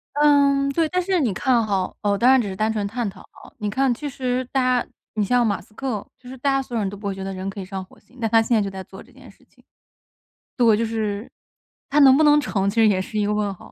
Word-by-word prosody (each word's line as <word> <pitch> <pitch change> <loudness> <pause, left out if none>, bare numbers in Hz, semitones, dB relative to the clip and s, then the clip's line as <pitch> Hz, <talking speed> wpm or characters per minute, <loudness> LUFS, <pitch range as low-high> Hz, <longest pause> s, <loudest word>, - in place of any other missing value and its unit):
嗯， 280 -1 +4
对。 320 +2 +1
但 365 0 0
是 370 -1 0
你 235 -9 0
看 235 +2 +1
哈， 195 -3 -1
哦， 200 -1 +1
当 245 +4 +4
然 265 -1 +6
只 205 - -4
是 190 - -5
单 215 +2 0
纯 210 -2 -2
探 230 -1 -3
讨 190 - -13
啊。 - - -16
你 210 -1 -2
看 260 +3 +1
其 290 +4 -5
实 255 -1 -2
大 255 -2 +2
家 - - -22 0.3
你 215 -1 0
像 245 +3 +2
马 205 -2 -1
斯 215 - -22
克 235 -5 -4
其 250 - -16
实 260 +1 -9
大 275 +2 0
家 270 0 +1
所 245 -2 -7
有 - - +1
人 195 - -1
都 200 - -9
不 205 0 -6
会 195 - -3
觉 190 - -6
得 195 0 -4
人 190 +1 -5
可 195 - -8
以 190 - -5
上 190 -1 -6
火 - - -21
星， 255 - -24
但 225 -2 -1
他 225 0 +5
现 230 +1 +1
在 215 - +3
就 200 - -2
在 190 -1 -7
做 190 - -13
这 - - -18
件 - - -16
事 - - -27
情。 - - -27 0.9
对， 230 -4 +4
就 230 - 0
是， 215 -1 -3 0.6
他 295 - +2
能 270 -1 +8
不 310 - +4
能 295 0 +6
成， 200 -8 -1
其 220 - -11
实 225 -1 +5
也 185 -2 +1
是 215 +2 -5
一 205 - +1
个 210 - 0
问 205 -1 -1
号。 - - -15
225 Hz, 320 characters per minute, -22 LUFS, 200-265 Hz, 0.9 s, 能